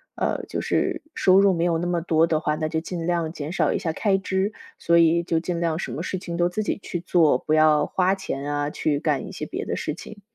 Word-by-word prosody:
呃， - - -1
就 - - -3
是 365 -3 0
收 190 -6 +5
入 200 -1 +5
没 170 -1 0
有 170 -2 +2
那 170 - -2
么 175 -1 0
多 165 -1 +3
的 160 -2 0
话， 150 -1 -1
那 155 0 -2
就 160 0 -1
尽 170 0 -5
量 170 -2 -1
减 150 -2 -5
少 190 - +1
一 - - 0
下 165 - -2
开 195 +4 +1
支， 190 +2 -1 0.3
所 170 0 +3
以 170 0 +4
就 170 -1 -1
尽 175 0 -3
量 165 -2 0
什 175 - -4
么 150 - -4
事 185 +2 -3
情 170 -2 -6
都 175 - +3
自 195 +5 -2
己 210 - -2
去 175 - -4
做， 165 -6 +3
不 155 - -2
要 155 -1 +4
花 185 +3 +1
钱 145 -7 -5
啊， 145 0 -1
去 150 -1 -1
干 145 - -1
一 - - -8
些 - - -5
别 - - -5
的 - - -2
事 - - -3
情。 215 -1 -11
170 Hz, 285 characters per minute, -24 LUFS, 155-185 Hz, 0.3 s, 收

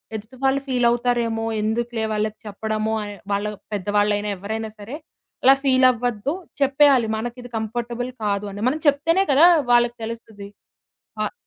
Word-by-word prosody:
ఎదుటి 220 +4 -8
వాళ్ళు 270 +1 +3
ఫీల్ 250 -2 +1
అవుతారేమో 235 -2 0 0.2
ఎందుకులే 225 +1 -1
వాళ్ళకి 215 0 -1
చెప్పడము 215 +1 -2
అని 205 0 -6 0.2
వాళ్ళ 200 +1 0 0.3
పెద్దవాళ్ళైనా 205 +1 0
ఎవరైనా 220 +3 -4
సరే? 215 +7 -7 0.5
అలా 265 - +8
ఫీల్ 260 -1 +4
అవ్వద్దు. 245 +3 -2 0.3
చెప్పేయాలి. 275 -3 +4
మనకి 240 +2 -5
ఇది 245 - -10
కంఫర్టబుల్ 235 +2 -3
కాదు 200 0 -1
అని. 205 +1 -7
మనం 290 +5 0
చెప్తేనే 330 +7 +3
కదా! 285 +5 +6 0.3
వాళ్ళకి 240 0 +4
తెలుస్తది. 220 -3 -7 0.8
ఆహ్ - - -2
230 Hz, 140 wpm, -22 LUFS, 210-250 Hz, 0.8 s, అలా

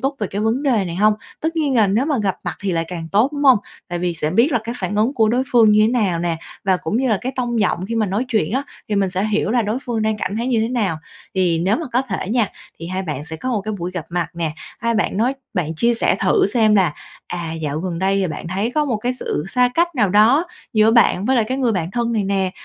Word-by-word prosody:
túc 270 +1 -1
về 210 - -1
cái 200 +2 -4
vấn 225 +6 0
đề 235 -9 +2
này 170 -1 -5
hông? 210 +2 +4 0.3
Tất 325 +1 -2
nhiên 290 -4 +1
là 220 -3 +5
nếu 220 +9 +1
mà 290 -6 +1
gặp 195 -2 0
mặt - - -2
thì 195 -2 -1
lại 165 0 0
càng 165 -3 -6
tốt, 230 +8 +3
đúng 290 0 -3
hông? 260 -5 +7 0.3
Tại 175 -1 -3
vì 175 -1 -1
sẽ 155 -1 -2
biết 235 - +3
là 245 - +3
cái 235 +1 -4
phản 185 +1 -3
ứng 225 +6 +2
của 220 -4 +3
đối 250 +3 +2
phương 225 -3 +6
như 215 +1 +5
nào 210 -8 +1
nè, 170 -1 -1 0.3
và 190 -2 +3
cũng 170 +4 -3
như 260 +1 +1
là 215 -4 +2
cái 260 +2 -3
tông 240 -3 -1
giọng 185 -1 0
khi 230 - -3
mà 220 -2 +1
nói 205 +7 -1
chuyện 215 -7 0
á, 265 +3 0 0.3
thì 210 - -1
mình 195 -2 +1
sẽ 185 +3 -1
hiểu 215 0 0
là 240 0 +2
đối 215 +4 -1
phương 235 -3 -1
đang 220 0 0
cảm 200 +1 -3
thấy 235 - -2
như 235 -3 +2
thế 225 - 0
nào. 210 -9 0 0.4
Thì 180 -3 +2
nếu 185 +6 +2
mà 320 - -4
có 250 - +2
thể 200 -6 -4
nha, 230 -4 +2 0.3
thì 165 - -7
hai 185 +1 -3
bạn 150 -5 -4
sẽ 160 0 -7
có 255 - -5
một 215 - 0
cái 215 +2 -4
buổi 175 +1 -3
gặp 180 -3 -5
mặt 175 0 -1
nè, 165 -2 -2 0.3
hai 230 +1 0
bạn 210 -3 0
nói 245 +5 +1 0.2
bạn 165 -3 -1
chia 235 +8 +2
sẻ 230 - +1
thử 405 -3 +3
xem 215 -2 +4
là, 185 -7 +3 0.3
à, 175 -2 -4
dạo 155 -2 -3
gần 175 -2 -3
đây 195 +1 +1
thì 190 - +1
bạn 165 - -6
thấy 210 +5 0
có 300 -1 +2
một 245 -6 0
cái 245 +4 -2
sự 150 - -2
xa 250 +1 +3
cách 345 0 +1
nào 215 -7 +2
đó 225 - +5 0.3
giữa 215 0 +4
bạn 210 -5 +4
với 260 +2 +2
lại 230 - +3
cái 260 +5 -3
người 245 -4 +2
bạn 175 -2 -2
thân 235 +1 -1
này 210 -3 0
nè. 195 -1 0
215 Hz, 290 wpm, -20 LUFS, 185-240 Hz, 0.4 s, hông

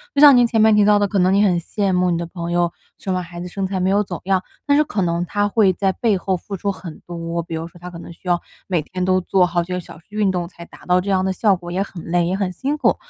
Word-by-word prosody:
就 280 - +3
像 290 -2 +10
您 245 -1 +6
前 225 -2 +2
面 220 -1 +6
提 210 -1 +5
到 210 0 +5
的， 205 - +2
可 200 - -2
能 185 +1 +3
你 200 - +4
很 180 -4 +3
羡 195 +3 -1
慕 180 0 +2
你 170 - +1
的 170 - -3
朋 170 0 -5
友， 175 0 +1 0.3
生 190 - -3
完 180 - -2
孩 175 0 -9
子 180 - -5
身 195 +2 -3
材 190 0 -2
没 185 +1 +1
有 200 +2 +3
走 180 -3 -7
样， 190 -1 +1 0.2
但 285 0 +3
是 300 - +5
可 210 -9 -3
能 170 -1 0
她 205 +3 0
会 205 -2 +3
在 195 +1 +1
背 210 +1 +1
后 185 0 -1
付 195 +3 -7
出 200 +2 -1
很 180 -4 -9
多。 170 -1 -4
比 165 - -6
如 165 +1 -4
说 175 - -17
她 180 +1 -8
可 175 - -10
能 170 - -10
需 175 - -16
要 175 -1 +2 0.3
每 175 -5 +1
天 185 +4 -5
都 185 0 +3
做 185 0 +3
好 175 0 0
几 180 +2 -6
个 180 - -1
小 170 - -11
时 165 - -27
运 210 -1 +1
动 175 -2 -2
才 170 -1 -12
达 - - -16
到 180 0 +3
这 200 - -5
样 190 -1 +2
的 190 - 0
效 200 +1 +3
果， 175 -1 -8
也 185 +2 -1
很 185 -4 -10
累， 175 0 +1
也 185 - 0
很 195 -2 -1
辛 270 - -2
苦。 290 - +3
185 Hz, 345 characters per minute, -20 LUFS, 175-200 Hz, 0.3 s, 像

